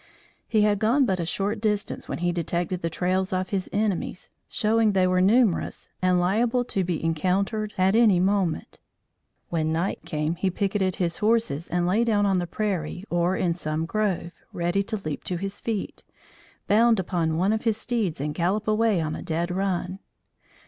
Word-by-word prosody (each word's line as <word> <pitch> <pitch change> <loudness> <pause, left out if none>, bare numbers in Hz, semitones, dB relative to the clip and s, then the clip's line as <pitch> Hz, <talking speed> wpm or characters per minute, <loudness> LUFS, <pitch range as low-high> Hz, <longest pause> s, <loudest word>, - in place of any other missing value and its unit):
He 215 -2 +3
had 205 -1 +2
gone 240 +6 +3
but 190 -5 0
a 170 - -2
short 205 +4 -2
distance 210 -2 -2
when - - -2
he 175 - +2
detected 175 +1 -2
the 165 - -1
trails 185 +3 0
of 185 0 -1
his 190 -2 -2
enemies, 205 -3 -2 0.2
showing 220 0 +2
they 190 -1 +3
were 185 0 +2
numerous 210 -1 +2
and 185 -1 +3
liable 230 +7 +1
to 195 -5 -1
be 175 -3 -2
encountered 195 +6 0
at 190 +2 +3
any 220 -6 +5
moment. 190 -3 0 0.7
When 160 -2 0
night 170 +4 -1
came, 155 0 -2
he 190 +2 -1
picketed 190 0 0
his 170 -2 -1
horses 215 -8 +1
and 175 0 0
lay 200 +6 +2
down 210 -3 +2
on 195 -2 +2
the 175 - -3
prairie 180 -3 -3
or 175 +2 +1
in 175 -2 +1
some 155 -1 -2
grove, 185 -2 -1 0.2
ready 175 +3 0
to 215 +2 -3
leap 155 -2 -4
to 180 - -2
his 195 +2 -5
feet, 220 -4 -4 0.6
bound 225 +1 +4
upon 165 -3 -1
one 190 +5 +2
of 220 - -1
his 225 -3 +1
steeds 225 - -1
and 150 +2 -2
gallop 190 +6 0
away 215 -4 +2
on 155 -1 -2
a - - -6
dead 170 +2 -2
run. 185 0 -2
190 Hz, 185 wpm, -25 LUFS, 175-210 Hz, 0.7 s, any